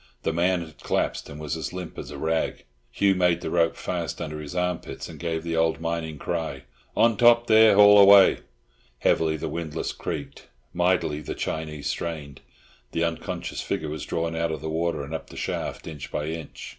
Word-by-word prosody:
The - - 0
man 90 +2 +2
had 80 -1 -16
collapsed, - - -1
and 70 - -9
was 75 0 -3
as 80 - -5
limp 90 -2 -6
as - - -7
a - - -7
rag. 80 0 -1 0.3
Hugh 100 -1 +3
made 90 -2 +2
the - - -4
rope 85 -1 +2
fast - - -4
under 75 0 -5
his 75 +3 -8
armpits, 90 -1 -2
and - - -11
gave 80 -2 -2
the 85 -1 -2
old 80 0 +2
mining 80 -2 -3
cry, - - -3 0.3
"On 115 -1 +5
top 120 +1 +5
there, 110 -2 +6
haul 105 0 +8
away." 100 -1 +8 0.6
Heavily 80 +4 +2
the - - -4
windlass 80 -2 -3
creaked. - - -6 0.3
Mightily 90 -4 +1
the - - -5
Chinee 75 -2 -4
strained. 75 -3 -4 0.5
The 85 - 0
unconscious 85 -1 -3
figure 80 - -3
was 75 - -5
drawn 85 0 -2
out 80 0 0
of 80 -3 -4
the 80 - -4
water 85 -2 -1
and 70 +3 -7
up 80 - -5
the - - -11
shaft, - - -4
inch 75 -3 -8
by 75 +1 -2
inch. 80 -1 -7
80 Hz, 195 wpm, -25 LUFS, 80-90 Hz, 0.6 s, haul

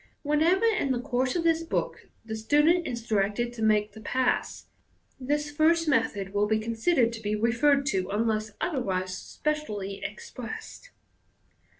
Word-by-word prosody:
Wherever 320 +8 +3
in 425 -11 +2
the 250 - 0
course 255 0 -1
of 345 - 0
this 330 -1 +3
book 335 +9 -3 0.2
the 220 -1 -4
student 295 +10 +3
is 235 -2 -5
directed 215 +3 0
to 235 - -8
make 215 -1 +2
the 220 +1 -12
pass, 255 +4 -1 0.5
this 295 +3 -1
first 330 +2 +3
method 200 -9 0
will 205 +1 +2
be 220 +1 +2
considered 230 +3 +1
to 225 - -7
be 210 0 -1
referred 275 +6 +2
to, 185 0 -1
unless 215 +1 0
otherwise 190 - -1
specially 210 -12 -4
expressed. 235 - -8
240 Hz, 150 wpm, -27 LUFS, 215-300 Hz, 0.5 s, Wherever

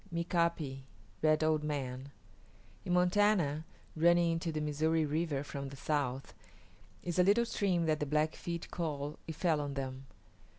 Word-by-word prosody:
MIKA´PI 170 -5 0 0.4
RED 155 0 +3
OLD 155 -1 +2
MAN 135 -3 -3 0.8
In 175 - 0
Montana, 180 -4 +3 0.3
running 170 +1 +4
into 165 0 -1
the 155 - -2
Missouri 155 +2 +1
River 150 -2 -1
from 140 -1 -5
the 140 - -9
south, 135 -2 -2 0.7
is 175 0 -2
a - - +7
little 205 +5 +4
stream 185 -7 0
that 155 -1 +1
the 150 - -1
Blackfeet 155 +3 -1
call 150 -3 -3
"It 160 - -5
Fell 160 -3 +1
on 140 -1 -4
Them." 135 0 -5
155 Hz, 145 wpm, -33 LUFS, 145-170 Hz, 0.8 s, a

